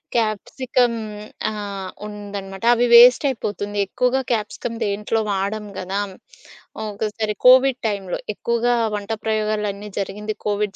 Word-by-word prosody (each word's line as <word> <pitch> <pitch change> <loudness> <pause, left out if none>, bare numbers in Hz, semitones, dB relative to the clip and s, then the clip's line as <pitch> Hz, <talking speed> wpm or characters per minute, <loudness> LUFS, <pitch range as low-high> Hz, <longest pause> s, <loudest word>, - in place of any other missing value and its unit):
Capsicum 240 +3 +1 0.6
ఆహ్, 200 -3 -5 0.2
ఉందనమాట. 200 -1 -7
అవి 240 +1 +2
వేస్టైపోతుంది 235 -4 +5
ఎక్కువగా 250 +5 +1
క్యాప్సికం 225 +1 -2
దేంట్లో 210 +2 -1
వాడం 200 +2 -2
గాదా! 195 +2 -2 0.9
ఒకసారి 210 +1 -3
కోవిడ్ 260 0 +6
టైమ్‌లో 195 -3 -3 0.2
ఎక్కువగా 235 +2 +1 0.2
వంట 205 +2 -5
ప్రయోగాలన్నీ 210 -1 -1
జరిగింది 210 +2 -4
కోవిడ్ 205 -1 -1
210 Hz, 100 wpm, -21 LUFS, 200-235 Hz, 0.9 s, కోవిడ్